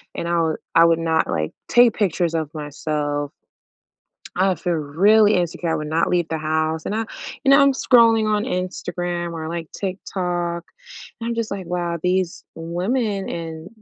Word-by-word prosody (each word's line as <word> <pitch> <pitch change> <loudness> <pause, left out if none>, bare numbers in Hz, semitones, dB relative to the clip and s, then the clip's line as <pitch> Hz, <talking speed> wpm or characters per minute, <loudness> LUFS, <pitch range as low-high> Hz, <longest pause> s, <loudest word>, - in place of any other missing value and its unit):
and 170 - -3
I 170 0 +1
would 160 -1 0 0.2
I 165 - +7
would 165 0 +3
not, 160 -1 +1
like, 80 -2 -2
take 240 -2 +5
pictures 175 -4 +1
of 160 -2 -2
myself. 145 -1 -3 1.0
I 190 +2 +2
would 185 -5 -1
feel 175 -2 -1
really 200 +8 +4
insecure, 175 -1 -1
I - - +1
would 150 -1 -3
not 160 +2 +1
leave 175 -2 +1
the 160 - -2
house, 155 +1 -1
and - - -3
I 225 +1 -1 0.4
you 275 - +4
know, 275 - +7
I'm 280 0 +5
scrolling 230 -4 +4
on 210 0 +1
Instagram 175 -1 -3
or 160 -1 -5
like 165 -1 -5
TikTok, 180 -3 -3 0.6
and 230 - -3
I'm 235 - -1
just 230 -1 -2
like, 195 -3 -5
"Wow, 175 -1 -2
these 180 -1 0
women, 195 +5 -2
and" 165 0 -6
175 Hz, 180 wpm, -21 LUFS, 160-195 Hz, 1.0 s, I